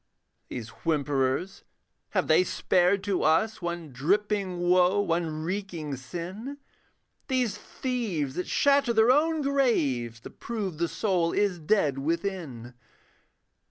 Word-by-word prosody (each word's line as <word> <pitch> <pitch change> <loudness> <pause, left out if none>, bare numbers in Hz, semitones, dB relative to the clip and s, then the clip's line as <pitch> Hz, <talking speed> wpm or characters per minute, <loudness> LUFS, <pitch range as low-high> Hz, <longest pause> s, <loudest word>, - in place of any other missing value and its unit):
These 115 -2 -6
whimperers 145 +2 0 0.5
have - - +2
they - - +5
spared 185 +1 +2
to 200 -3 0
us 175 +9 +2
One 170 -3 -4
dripping 190 +7 0
woe, 180 +2 +3
one 165 -5 -1
reeking 170 -5 -3
sin? 180 - -7 0.7
These 250 -6 0
thieves 210 - -3
that 180 - -3
shatter 280 -3 +3
their 220 +2 +5
own 310 +2 +2
graves 150 - +1
To - - -10
prove 200 -9 -5
the 170 - +1
soul 180 -4 0
is 200 -4 +1
dead 150 -5 +1
within. 160 - -3
180 Hz, 120 wpm, -27 LUFS, 155-210 Hz, 0.7 s, they